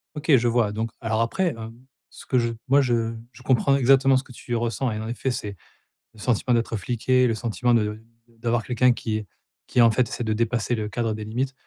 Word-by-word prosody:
OK, 150 -1 +3
je 120 +1 +1
vois. 115 -3 +2
Donc, 110 +1 -3
alors 115 -1 0
après, 180 +11 0
hem, 115 0 -8 0.4
ce - - -13
que 130 - +1
je 115 -1 +1 0.2
moi, 140 +2 +5
je 115 -3 0 0.2
je - - -16
comprends 130 +2 +3
exactement 135 0 +4
ce 130 - +1
que 130 - -16
tu 120 0 -5
ressens. 120 +2 -1
Et 110 - -4
en 110 - -5
effet, 125 +2 -2
c'est 105 -4 -5 0.6
le 110 - -18
sentiment 125 +2 +1
d'être 115 -1 0
fliqué, 125 +5 +1
le 115 - +1
sentiment 120 +2 0
de 105 -1 +1 0.3
d'avoir 115 0 -2
quelqu'un 125 +1 +3
qui 110 -2 -3 0.4
qui, 120 - +3
en 115 - +7
fait, 120 +2 +1
essaie 120 - -4
de 110 -1 0
dépasser 115 +1 0
le 110 -2 -3
cadre 115 0 -1
des 110 0 -6
limites. 125 +5 -2
120 Hz, 220 wpm, -24 LUFS, 110-125 Hz, 0.6 s, en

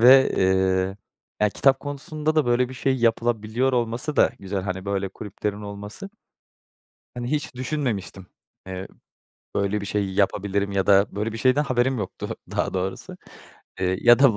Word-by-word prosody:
ve, 130 +3 +8
eee, 95 0 +2 0.4
ya, 105 - +4
kitap 135 +5 +3
konusunda 150 +2 -3
da 155 -5 +3
böyle 120 +1 +2
bir 130 - -8
şey 130 +1 +1
yapılabiliyor 115 +1 +1
olması 120 +5 -1
da - - +5
güzel. 95 0 -3
Hani, 95 0 -4
böyle 100 -1 -1
kulüplerin 105 +1 -5
olması. 105 - -7 1.0
Hani, 120 +1 -4
hiç 145 -4 -2
düşünmemiştim, 120 -9 -3 0.4
eee, 95 0 -5 0.7
böyle 100 +1 0
bir 100 - -5
şey 100 -1 -1
yapabilirim 100 0 +1
ya 95 -1 0
da 100 0 +6
böyle 110 +2 -1
bir 115 - -5
şeyden 130 +5 +3
haberim 130 -1 +1
yoktu 100 - -5
daha - - -1
doğrusu. 95 +1 -3 0.6
Eee, 95 0 +1
ya 120 0 +7
da 135 -7 +5
105 Hz, 155 wpm, -24 LUFS, 100-130 Hz, 1.0 s, ve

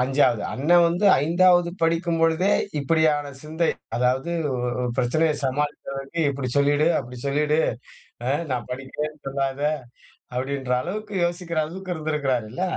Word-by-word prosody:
5வது 125 -4 +2
அண்ண 145 +6 -2 0.2
வந்து 175 +5 +1 0.2
5வது 175 +1 +4
படிக்கும் 165 0 +1
பொழுதே 165 +4 +3 0.3
இப்டியான 150 0 +2
சிந்தை 160 +3 -1 0.3
அதாவது 125 +6 +1 0.2
ஒ - - -1 0.3
உ - - 0
பிரச்சனைய 150 +5 +2
சமாளித்த 145 +3 -2
வேண்டி 135 +5 -4
இப்டி 135 -2 -3
சொல்லிடு 145 +2 +3
அப்டி 125 -1 -9
சொல்லிடு 150 +2 +2 0.7
ஆ - - +2 0.2
நான் 125 -2 -2
படிக்கிறேன்னு 150 +4 -5
சொல்லாத 135 0 -2 0.8
அப்டின்ற 130 0 -1
அளவுக்கு 210 +2 -5
யோசிக்கிற 175 -2 -2
அளவுக்கு 180 +3 -5
இருந்திருக்கிறார்ல 140 -4 -2
150 Hz, 125 wpm, -24 LUFS, 135-165 Hz, 0.8 s, 5வது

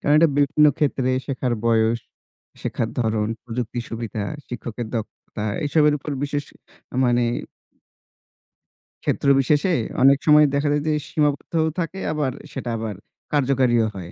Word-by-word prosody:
কারণ 145 - +2
এটা 165 +1 +6
বিভিন্ন 150 +1 +4
ক্ষেত্রে 135 -4 +1 0.2
শেখার 130 -3 -1
বয়স, 115 0 +3 0.6
শেখার 115 - -2
ধরণ, 110 -2 0 0.2
প্রযুক্তির 120 0 -4
সুবিধা, 115 -2 -4 0.3
শিক্ষকের 120 -1 -5
দক্ষতা 110 -1 -6 0.2
এসবের 150 0 +4
উপর 150 - -7
বিশেষ 145 0 -2 0.5
আ - - -2
মানে 120 -1 +3 1.8
ক্ষেত্র 140 - 0
বিশেষে, 150 +7 +2 0.3
অনেক 135 +1 +7
সময় 150 -1 +7
দেখা 140 +1 +1
যায় 145 0 0
যে 155 - +2
সীমাবদ্ধও 150 +2 0
থাকে 180 +3 -3
আবার, 145 -4 -1 0.2
সেটা 125 -3 -4
আবার 110 -3 -4 0.4
কার্যকারীও 130 -5 +3
হয়। 90 -2 -7
130 Hz, 130 wpm, -22 LUFS, 115-150 Hz, 1.8 s, অনেক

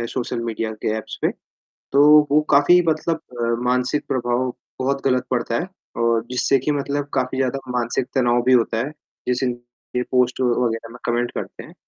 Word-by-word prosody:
हैं 115 - -2
social 125 -1 -3
media 115 -1 -2
के - - 0
apps - - -8
पे। - - +3 0.6
तो 140 +1 +5 0.3
वो 150 - +5
काफ़ी 145 +6 +6
मतलब 160 +1 +1 0.2
अ, - - +1 0.2
मानसिक 125 +4 +1
प्रभाव 125 0 0 0.3
बहुत 135 +1 -1
ग़लत 125 -1 +2
पड़ता 120 -2 0
है 175 - -3 0.4
और 115 -1 +2
जिससे 130 +1 +2
कि 150 +4 -1
मतलब 145 0 -2
काफ़ी 130 0 -1
ज़्यादा 135 +1 0
मानसिक 125 0 -1
तनाव 120 -2 +3
भी 130 - +4
होता 115 -2 +3
है, 135 +6 -2 0.4
जैसे 125 0 +1 0.6
पोस्ट 125 0 +2
वग़ैरह 120 -2 0
में 120 - -10
कमेंट 120 +1 0
करते - - -6
हैं, - - -14
125 Hz, 175 wpm, -21 LUFS, 120-135 Hz, 0.6 s, काफ़ी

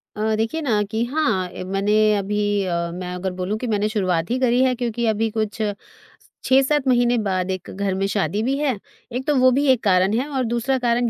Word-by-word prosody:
अ, 215 +1 0
देखिए 225 +9 -1
ना 220 -8 +1
कि 225 +1 0
हाँ, 240 -10 0
ए - - -7
मैंने 195 +3 0 0.2
अभी 205 0 0
अ, 170 -1 -1
मैं 180 0 -5
अगर 185 +1 -3
बोलूँ 185 +4 -3
कि 245 - -4
मैंने 210 -1 0
शुरुआत 185 -5 0
ही 255 - 0
करी 250 0 +3
है 255 -1 +2
क्योंकि 235 -1 -2
अभी 220 +1 +1
कुछ 220 0 -3
स 205 -1 0 0.7
6-7 270 +1 +3
महीने 245 -1 +3
बाद 190 -3 -1
एक 185 -2 -5
घर 195 0 -2
में 195 +1 0
शादी 205 +1 -1
भी 270 +3 0
है। 285 -5 0 0.4
एक 260 +2 -3
तो 295 - +2
वो 255 0 +6
भी 280 +3 +1
एक 245 -2 +1
कारण 190 0 +3
है 275 - -2
और 260 - +1
दूसरा 240 +3 0
कारण 240 -1 +1
220 Hz, 220 wpm, -22 LUFS, 195-250 Hz, 0.7 s, वो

